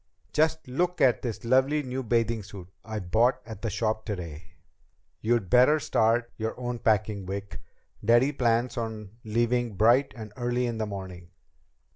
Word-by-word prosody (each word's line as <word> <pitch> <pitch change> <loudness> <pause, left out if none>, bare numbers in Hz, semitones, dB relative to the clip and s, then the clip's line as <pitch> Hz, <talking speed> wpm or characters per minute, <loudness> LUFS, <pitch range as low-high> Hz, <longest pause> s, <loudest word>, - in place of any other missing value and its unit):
"Just 160 -1 +1
look 175 +8 -1
at 130 -3 +4
this 115 -3 -5
lovely 135 +5 +3
new 130 0 -4
bathing 115 -1 0
suit 95 -2 -10 0.2
I 110 0 -5
bought 115 +7 +2
at 110 -3 -9
the 115 - -2
shop 110 +1 -1
today!" 85 -7 -7 0.7
"You'd 115 -3 +1
better 130 - +5
start 115 -2 +1
your 110 +2 -4
own 120 -1 -3
packing, 105 -3 0
Vic. 100 +1 -5 0.4
Daddy 120 +6 +4
plans 120 -2 0
on 110 -3 -5
leaving 120 0 0
bright 120 +7 +4
and 110 -2 -8
early 120 0 -1
in 115 -2 -3
the 110 - -1
morning." 95 -3 -8
115 Hz, 155 wpm, -27 LUFS, 105-125 Hz, 0.7 s, better